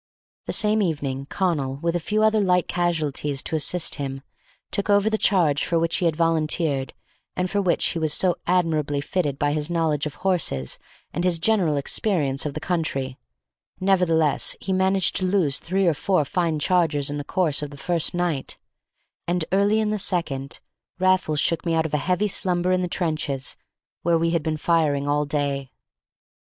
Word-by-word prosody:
The - - -2
same 215 0 +2
evening 140 -6 -2
Connal, 150 -9 -1
with 170 +2 -1
a - - +1
few 210 +6 0
other 220 0 +4
light 180 -3 +2
casualties 150 -5 -1
to - - -2
assist 160 0 +1
him, 135 -1 -5 0.5
took 200 - -1
over 205 +1 +3
the - - +2
charge 160 -8 +3
for 170 - 0
which 165 0 +1
he 180 - -1
had 160 - 0
volunteered 155 -4 0 0.4
and 180 0 0
for 205 - +1
which 180 -3 +1
he 170 - -3
was 155 -1 0
so 180 +3 +2
admirably 160 -5 +1
fitted 145 -1 -2
by 145 0 +1
his 150 +1 -1
knowledge 160 -3 0
of 145 - -8
horses 165 - -1 0.3
and 175 - -2
his 180 -2 +1
general 170 -4 +2
experience 140 -2 0
of 145 - -6
the - - -2
country; 150 -7 -2 0.6
nevertheless, 175 -6 +2
he 190 - -3
managed 190 0 +2
to 185 - 0
lose 180 -8 +1
three 190 +2 0
or 170 - +4
four 155 +1 +1
fine 165 +1 0
chargers 150 -3 +1
in 145 - -3
the 145 - -4
course 160 -2 +1
of 145 - -4
the 145 - -11
first 170 +3 +1
night; 170 -6 -2 0.7
and, 175 -1 0
early 200 +3 +3
in 215 -1 0
the 215 - -1
second, 140 -8 -1 0.4
Raffles 185 -5 +2
shook 165 +2 +1
me 165 -2 0
out 160 0 +1
of 160 - -5
a - - +3
heavy 180 +7 0
slumber 180 -2 0
in 185 0 +2
the 180 - -1
trenches 155 -6 -2 0.5
where 170 0 +2
we 165 0 +1
had 170 -1 +1
been 155 0 -2
firing 150 -3 +1
all 145 +1 +1
day. 140 -2 -2
165 Hz, 185 wpm, -23 LUFS, 145-185 Hz, 0.7 s, other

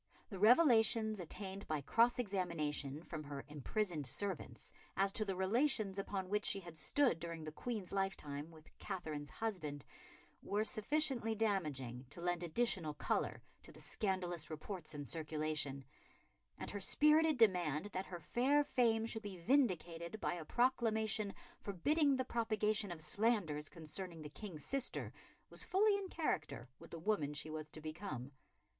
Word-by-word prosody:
The 195 - -5
revelations 225 - +5
attained 190 +3 -6
by 155 -2 -1
cross 230 - +4
examination 165 - -1
from 155 -3 -5
her 140 -1 -6
imprisoned 150 - -2
servants 190 - -3 0.2
as 195 0 +3
to 215 - +2
the 195 -2 -2
relations 205 0 +2
upon 195 -1 -3
which 210 +2 0
she 195 - +1
had 170 -3 -10
stood 165 - +2
during 170 -1 -5
the 155 - -5
Queen's 210 +2 -4
lifetime 160 -7 -2
with 160 -2 -16
Katherine's 155 -7 -4
husband, 160 -8 -4 0.6
were 205 +2 0
sufficiently 235 0 +1
damaging 145 - -1
to 155 - -11
lend 175 0 0
additional 175 -4 +1
colour - - -1 0.2
to - - -11
the - - -14
scandalous 180 -6 -2
reports 155 0 -5
in 145 -1 -4
circulation, 155 -3 -1 0.7
and - - -4
her 205 - -3
spirited 305 +7 +5
demand 180 - +3
that 185 +1 -2
her 175 -2 -6
fair 265 - +3
fame 230 -5 +2
should 225 -1 -2
be 200 -3 -6
vindicated 175 - +1
by - - 0
a 175 -2 -5
proclamation 220 -3 +2 0.3
forbidding 280 - +2
the 260 0 -1
propagation 215 -4 +1
of 160 -2 -5
slanders 190 -9 +1
concerning 165 +1 -5
the 150 - -6
King's 160 -3 -8
sister 275 -1 -2 0.4
was - - -6
fully 410 +2 +4
in 400 -1 -2
character 155 - -2
with - - -12
the 170 - -6
woman 160 -5 0
she 155 +1 -5
was 155 -1 -5
to 155 - -8
become. 155 -4 -5
190 Hz, 150 wpm, -38 LUFS, 155-220 Hz, 0.7 s, revelations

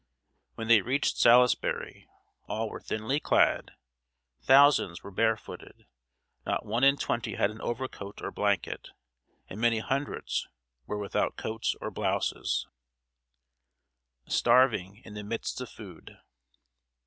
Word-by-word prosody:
When 115 - -5
they 115 -3 +6
reached 130 +7 0
Salisbury, 125 +1 +3 0.4
all 110 0 -3
were - - -7
thinly 110 +7 -2
clad, - - +2 0.7
thousands 135 -10 +5
were 100 - -9
barefooted, 110 +3 -2 0.6
not - - -2
one 115 +4 -1
in 140 +1 +6
twenty 115 -5 -2
had 100 - +1
an 110 - -11
overcoat 120 -5 -5
or - - -5
blanket, 100 -3 -1 0.6
and 105 - -8
many 120 -1 +3
hundreds 135 +5 -2 0.4
were 105 - -3
without 100 -1 -1
coats 110 0 -2
or - - -5
blouses. - - -1 1.6
[Sidenote: - - -7
STARVING 115 -5 +3
IN 105 - -10
THE 105 0 -6
MIDST 115 +4 -4
OF 125 - -6
FOOD. 95 -7 -12
115 Hz, 125 wpm, -28 LUFS, 105-125 Hz, 1.6 s, they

